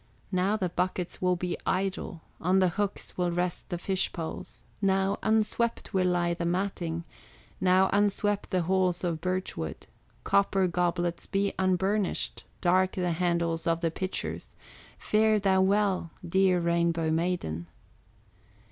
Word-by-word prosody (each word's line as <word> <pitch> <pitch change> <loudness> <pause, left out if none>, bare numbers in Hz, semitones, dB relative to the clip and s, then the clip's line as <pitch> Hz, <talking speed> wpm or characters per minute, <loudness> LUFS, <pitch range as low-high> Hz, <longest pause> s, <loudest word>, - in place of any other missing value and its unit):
Now 190 +3 +2
the 185 -4 -1
buckets 180 0 -2
will 180 0 +3
be 180 0 -2
idle, 185 -3 -2 0.2
On 185 +3 +2
the 185 -1 +4
hooks 200 +1 -3
will 180 -1 +2
rest 175 0 -2
the 175 - -2
fish 190 +1 -1
poles, 165 -2 -7 0.2
Now 195 0 +2
unswept 220 +1 0
will 185 -1 +3
lie 175 -1 +1
the 170 - -4
matting, 170 -2 -1 0.6
And 185 +1 +5
unswept 205 0 +1
the 185 -2 +1
halls 185 0 +1
of 165 -3 -1
birch 185 +1 -2
wood, 80 - -5 0.4
Copper 195 -1 +3
goblets 175 -1 -1
be 200 0 0
unburnished, 190 +1 0 0.2
Dark 185 +1 +3
the 180 -2 0
handles 170 -1 0
of 165 0 +1
the 165 -2 +1
pitchers, 185 +3 -5 0.4
Fare 215 0 +3
thou 190 -2 +3
well, 195 -2 +2 0.2
dear 185 0 +3
Rainbow 170 -1 +1
Maiden." 160 - -1
185 Hz, 140 wpm, -28 LUFS, 170-195 Hz, 0.6 s, And